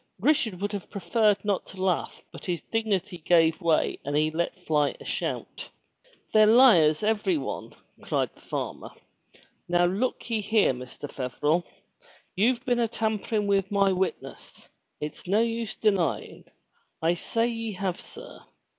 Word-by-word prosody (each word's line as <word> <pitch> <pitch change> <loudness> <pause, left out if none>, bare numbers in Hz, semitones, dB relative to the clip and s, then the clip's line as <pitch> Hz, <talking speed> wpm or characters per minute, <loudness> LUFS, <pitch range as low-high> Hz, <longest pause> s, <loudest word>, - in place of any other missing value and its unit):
Richard 245 - +2
would 205 +1 -2
have 200 -3 -6
preferred 210 0 +1
not 200 -3 -1
to 190 -1 -7
laugh 185 -3 -1
but - - -11
his 175 -4 -2
dignity 205 -5 -2
gave 165 +1 +3
way 165 -2 +1
and 145 +1 -1
he 155 +1 +2
let 170 +3 -2
fly 150 -2 +1
a - - -12
shout. - - -4 0.6
"They're 215 0 +6
hars, 170 -11 +6
every 220 - +1
one!" - - -5 0.3
cried - - -1
the - - -22
farmer. - - -5 0.8
"Now 175 0 +3
look 200 +8 -1
ye 225 -2 -1
here, 210 -7 +3
Mr. 125 +3 -8
Feverel! 145 +6 -1 0.7
You've 235 +6 +2
been 245 -2 +1
a 235 - +2
tampering 220 -1 -1
with 195 -1 +1
my 200 -1 +3
witness! 190 0 -4 0.3
It's 150 +3 -7
no 205 +4 +3
use 230 -2 -2
denyin'! 195 -8 0 0.5
I 165 +1 +2
say 230 +6 -1
ye 230 -2 -3
have, 185 -1 -3
sir - - -11
195 Hz, 150 wpm, -27 LUFS, 170-220 Hz, 0.8 s, They're